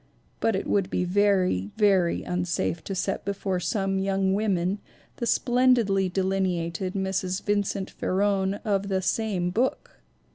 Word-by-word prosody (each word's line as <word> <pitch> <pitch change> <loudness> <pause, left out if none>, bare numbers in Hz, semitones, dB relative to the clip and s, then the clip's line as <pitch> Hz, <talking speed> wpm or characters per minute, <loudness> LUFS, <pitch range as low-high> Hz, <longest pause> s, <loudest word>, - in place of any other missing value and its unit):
But 225 - +1
it 190 - -2
would 195 -2 +1
be 180 - 0
very, 185 - +2
very 190 -5 +3
unsafe 180 -2 -2
to 195 - -4
set 185 - -2
before 195 -2 -2
some 195 +1 -1
young 195 0 +1
women 195 -2 0 0.4
the 235 - -2
splendidly 240 -7 +3
delineated 185 -1 -1
Mrs. 190 -1 -1
Vincent 205 -1 -1
Farron 195 0 0
of 200 -2 0
that 190 -1 -1
same 185 -3 0
book! 245 +7 -2
195 Hz, 135 wpm, -26 LUFS, 185-205 Hz, 0.4 s, very